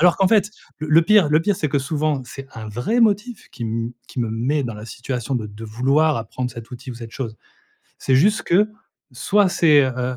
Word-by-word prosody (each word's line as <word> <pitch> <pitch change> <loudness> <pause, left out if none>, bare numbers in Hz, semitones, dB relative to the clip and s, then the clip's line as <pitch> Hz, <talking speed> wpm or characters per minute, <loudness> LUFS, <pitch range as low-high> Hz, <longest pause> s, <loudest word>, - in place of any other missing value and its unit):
Alors 175 +1 +5
qu'en 195 - +3
fait 210 -2 +3 0.3
le 155 - -5
le 160 +2 +6
pire 200 -4 +5
le 155 +2 +4
pire 205 +4 +1
c'est 150 - -1
que 140 - +1
souvent, 145 0 -1
c'est 135 +2 -10
un 110 -1 -7
vrai 125 - -1
motif 220 +1 +1
qui 120 -3 -6
me 115 +1 -3 0.2
qui - - -8
me 115 - -1
met 135 +5 0
dans 115 -3 -4
la 105 +1 -9
situation 120 +3 -4
de 110 -3 -4
de 105 +2 -10
vouloir 135 +8 +2
apprendre 120 +3 -4
cet 115 0 -10
outil 125 +1 -8
ou - - -7
cette 115 -1 -10
chose. 115 -5 -5 0.6
C'est 130 - +1
juste 205 +10 +3
que 205 +5 +3 0.4
soit 195 +9 +2
c'est, 150 -5 +5
heu, 125 0 -2
135 Hz, 225 wpm, -21 LUFS, 115-165 Hz, 0.6 s, le